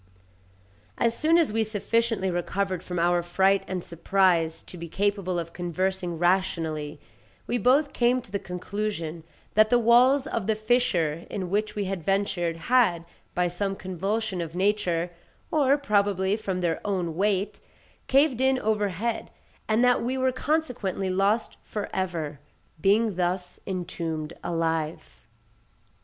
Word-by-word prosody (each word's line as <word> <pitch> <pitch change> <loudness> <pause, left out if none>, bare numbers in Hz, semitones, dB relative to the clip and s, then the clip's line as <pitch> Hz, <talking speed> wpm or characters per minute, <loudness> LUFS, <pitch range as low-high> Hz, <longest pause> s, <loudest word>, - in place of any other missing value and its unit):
As 230 0 +2
soon 320 +5 +3
as 320 -10 +2
we 225 0 +2
sufficiently 220 -1 0
recovered 185 +1 -1
from 180 - -5
our 175 +1 +3
fright 190 +3 +2
and 185 -2 -3
surprise 170 -1 +1
to - - -11
be 170 -1 -7
capable 200 -1 0
of 170 0 -4
conversing 180 0 -2
rationally, 165 -4 0 0.5
we 245 - -1
both 275 +6 +3
came 245 +1 +3
to 235 - -16
the 200 - -1
conclusion 180 -3 -4 0.3
that 215 +1 +5
the 245 - +5
walls 245 +4 +5
of 230 -9 -3
the 220 - +2
fissure 210 -9 +1
in 185 -3 -4
which 210 +2 0
we 205 -1 -1
had 190 -2 -3
ventured 195 -3 0
had, 175 -2 +2 0.3
by 180 0 +2
some 195 +3 -2
convulsion 195 +2 -2
of 165 0 -6
nature, 180 -3 +1 0.4
or 285 -2 +4
probably 200 -6 +1
from 190 -4 -3
their 170 -2 0
own 180 -5 -1
weight, 200 +1 0 0.5
caved 270 -2 +3
in 265 0 +3
overhead, 215 0 -1 0.4
and 220 +2 +3
that 245 0 +4
we 255 +2 -1
were 260 0 +2
consequently 250 - -1
lost 200 +4 +1
for 210 -2 -5
ever, 165 -6 -2 0.4
being 210 0 +3
thus 180 0 -2
entombed 170 -4 -4
alive. 160 - -2
195 Hz, 140 wpm, -26 LUFS, 175-220 Hz, 0.5 s, that